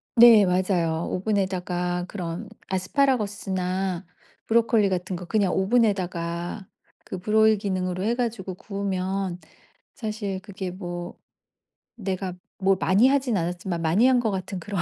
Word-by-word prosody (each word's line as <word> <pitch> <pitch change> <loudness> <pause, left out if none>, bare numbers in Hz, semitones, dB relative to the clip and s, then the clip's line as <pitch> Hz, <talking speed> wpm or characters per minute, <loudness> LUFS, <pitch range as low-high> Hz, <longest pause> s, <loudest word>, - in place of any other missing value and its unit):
네. 230 -4 +9
맞아요. 180 -3 +1
오븐에다가 180 -3 -1
그런 175 -4 -5 0.2
아스파라거스나 190 -4 0 0.4
브로콜리 225 -3 +3
같은 185 0 -2
거 180 - -7
그냥 195 -1 +1
오븐에다가 190 -4 0 0.4
그 190 - -6
Broil 215 +3 +4
기능으로 185 -2 -2
해가지고 225 -5 -1
구우면 190 -2 -3 0.6
사실 210 -4 -4
그게 190 -2 -6
뭐 175 -2 -6 0.8
내가 190 -3 -3 0.2
뭐 195 0 +3
많이 195 +7 +4
하지 275 -2 +2
않았지만 175 -3 -1
많이 190 +10 +4
한 255 -1 +4
것 225 -3 0
같은 190 0 -4
그런 195 0 -3
190 Hz, 295 characters per minute, -25 LUFS, 180-215 Hz, 0.8 s, 네